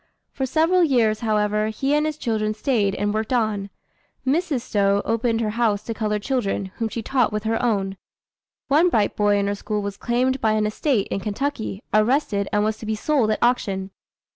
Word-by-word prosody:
For 265 -1 -2
several 330 +6 +3
years, 230 -8 +2
however, 210 -1 +1
he 270 +6 -1
and 300 +1 +2
his 305 -1 -3
children 215 -5 -1
stayed 215 -5 +1
and 205 +1 -1
worked 220 +2 -2
on. 215 -5 0 0.6
Mrs. 295 -1 +1
Stowe 200 -3 +1
opened 230 0 0
her 215 -2 0
house 220 -3 0
to 230 - -4
colored 210 -2 -2
children, 200 -7 -1
whom 225 -1 -1
she 230 +1 -5
taught 250 -1 +1
with 210 0 -3
her 225 0 0
own. 195 -5 0 0.7
One 310 +6 +4
bright 215 -9 +1
boy 205 -1 +3
in 200 - +1
her 200 - 0
school 210 +1 -3
was 200 0 -4
claimed 255 +2 0
by 220 -1 +2
an 215 0 +1
estate 215 0 0
in - - -2
Kentucky, 220 0 -3
arrested, 215 -2 +2
and 210 0 +2
was 215 0 -1
to 220 - -8
be 220 - 0
sold 255 0 +1
at 215 - +1
auction. 195 -6 0
220 Hz, 195 wpm, -23 LUFS, 210-250 Hz, 0.7 s, One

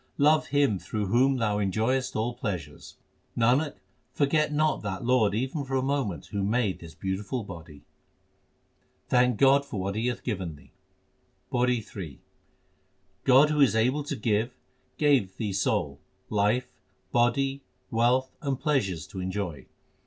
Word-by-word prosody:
Love 150 +2 +4
Him 140 -8 +2
through 105 +2 -3
whom 130 +7 +3
thou 105 -3 0
enjoyest 110 +6 0
all 115 +3 -1
pleasures. 90 - -6 0.4
Nanak, 130 +6 +2 0.4
forget 150 +1 +1
not 150 0 +1
that 100 +2 -4
Lord 115 -5 +3
even 130 +6 -2
for 135 0 -3
a 130 - +1
moment 130 - -1
who 100 - -2
made 105 0 0
this 80 -1 -11
beautiful 100 +5 -3
body. 80 -6 -11 1.3
Thank 125 -2 +3
God 135 +3 +5
for 115 -8 -6
what 95 +1 -2
He 110 +4 -1
hath 125 - -3
given 95 - -3
thee: 75 - -19 0.8
PAURI 125 -2 +1
III 80 -9 -7 1.1
God 135 +4 +6
who 150 -1 +2
is 130 -5 +5
able 125 +6 +2
to 145 -1 -3
give, 115 +1 -1 0.4
gave 130 -11 +2
thee 105 -3 -2
soul, 95 - 0 0.3
life, 105 +4 +1 0.4
body, 135 +3 +1 0.3
wealth, 125 +3 +2
and 140 -3 -2
pleasures 115 - 0
to 95 - -8
enjoy. 95 -4 -4
120 Hz, 145 wpm, -27 LUFS, 100-135 Hz, 1.3 s, God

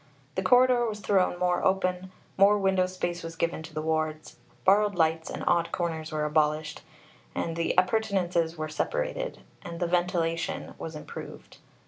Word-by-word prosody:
The 190 - -1
corridor 245 +4 +4
was 210 -1 -4
thrown 190 -3 +2
more 180 0 +1
open; 185 -1 0 0.2
more 200 +2 +5
window 190 -2 +2
space 175 -2 -3
was 165 0 -7
given 165 0 -1
to 160 - -10
the 155 0 -4
wards; 155 -1 -2 0.3
borrowed 205 +1 +4
lights 160 -1 +1
and - - -5
odd 170 -1 +2
corners 160 -3 -3
were 155 -1 -1
abolished; 150 0 0 0.5
the 165 0 -1
appurtenances 180 -4 +1
were 155 0 -3
separated; - - -3 0.2
and 170 -3 -7
the 175 - +1
ventilation 175 0 -1
was 160 -1 -6
improved. 150 - -9
175 Hz, 150 wpm, -28 LUFS, 160-190 Hz, 0.5 s, more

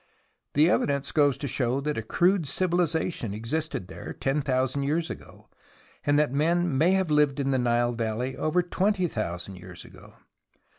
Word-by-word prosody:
The 150 +3 +5
evidence 140 -5 +1
goes 145 -3 +3
to 140 - -4
show 130 0 0
that 150 +1 -2
a - - -2
crude 175 - +2
civiliza 170 +1 +1
tion 105 -8 -4
existed 115 - -3
there 95 - -8
ten 135 +2 -1
thousand 130 0 0
years 160 +4 -1
ago, - - -11 0.6
and 145 0 +2
that 150 -4 +2
men 165 +2 +1
may 165 +7 +4
have 190 -4 +1
lived 150 -2 +3
in 135 0 0
the 130 - +2
Nile 120 0 +1
valley 115 +3 -2
over 165 +3 +1
twenty 185 +1 +1
thousand 95 - -4
years 90 -1 -11
ago. - - -15
140 Hz, 170 wpm, -27 LUFS, 120-160 Hz, 0.6 s, The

